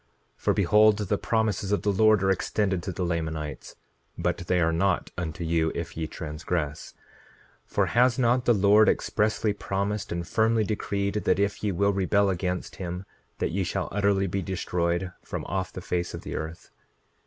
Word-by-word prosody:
9:24 -, -, -26 dB
For -, -, +3 dB
behold, 105 Hz, +3 st, +5 dB
the 105 Hz, -4 st, -1 dB
promises 110 Hz, -3 st, 0 dB
of 105 Hz, -, +1 dB
the 105 Hz, -, +2 dB
Lord 110 Hz, 0 st, +4 dB
are 95 Hz, -, +3 dB
extended 95 Hz, 0 st, 0 dB
to 95 Hz, -, -4 dB
the 90 Hz, 0 st, -2 dB
Lamanites, 80 Hz, -3 st, -4 dB, 0.4 s
but -, -, 0 dB
they 90 Hz, -1 st, +2 dB
are 80 Hz, -1 st, +2 dB
not 95 Hz, +2 st, +1 dB
unto 85 Hz, -1 st, -4 dB
you 80 Hz, -1 st, +1 dB
if 85 Hz, 0 st, -5 dB
ye 80 Hz, -1 st, -3 dB
transgress; 75 Hz, -1 st, -4 dB, 0.7 s
for -, -, +1 dB
has 125 Hz, +1 st, +3 dB
not 125 Hz, 0 st, +2 dB
the 120 Hz, -, +5 dB
Lord 105 Hz, +2 st, +5 dB
expressly 105 Hz, 0 st, +1 dB
promised 100 Hz, +1 st, -3 dB
and 85 Hz, 0 st, -3 dB
firmly 110 Hz, 0 st, +2 dB
decreed, 100 Hz, -1 st, -2 dB
that -, -, +3 dB
if 100 Hz, +1 st, -1 dB
ye 105 Hz, -, +1 dB
will 100 Hz, +3 st, +2 dB
rebel 100 Hz, +1 st, +2 dB
against 90 Hz, 0 st, -3 dB
him 90 Hz, +1 st, -5 dB, 0.3 s
that -, -, -1 dB
ye 95 Hz, +3 st, 0 dB
shall -, -, -2 dB
utterly 100 Hz, 0 st, +2 dB
be 95 Hz, +1 st, -2 dB
destroyed 90 Hz, -1 st, -1 dB
from -, -, -5 dB
off 95 Hz, 0 st, -2 dB
the 90 Hz, -, -7 dB
face 85 Hz, 0 st, -2 dB
of -, -, -7 dB
the -, -, -5 dB
earth? 80 Hz, +2 st, -6 dB
95 Hz, 180 wpm, -26 LUFS, 85-105 Hz, 0.7 s, behold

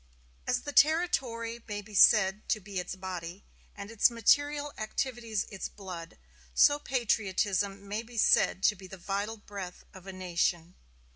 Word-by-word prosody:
As 245 Hz, -, +1 dB
the 290 Hz, -, -6 dB
territory 250 Hz, -8 st, +2 dB
may 205 Hz, -1 st, -4 dB
be 210 Hz, +1 st, -15 dB
said 200 Hz, 0 st, +5 dB
to 215 Hz, -, +1 dB
be 195 Hz, -1 st, -5 dB
its 180 Hz, -, -5 dB
body, 185 Hz, 0 st, -7 dB, 0.3 s
and 200 Hz, +1 st, -8 dB
its 225 Hz, +1 st, +4 dB
material 290 Hz, +5 st, +2 dB
activities 225 Hz, -1 st, -2 dB
its 195 Hz, -, -5 dB
blood, 180 Hz, -5 st, -9 dB, 0.4 s
so 290 Hz, 0 st, +5 dB
patriotism 200 Hz, -6 st, -1 dB
may 210 Hz, +2 st, -3 dB
be 235 Hz, +1 st, -13 dB
said 195 Hz, -2 st, +3 dB
to 210 Hz, -, +4 dB
be 190 Hz, -1 st, -12 dB
the 190 Hz, -, -10 dB
vital 200 Hz, +5 st, -3 dB
breath 200 Hz, -4 st, -8 dB
of 190 Hz, 0 st, -13 dB
a -, -, -5 dB
nation. 175 Hz, -2 st, -1 dB
205 Hz, 155 wpm, -30 LUFS, 190-230 Hz, 0.4 s, said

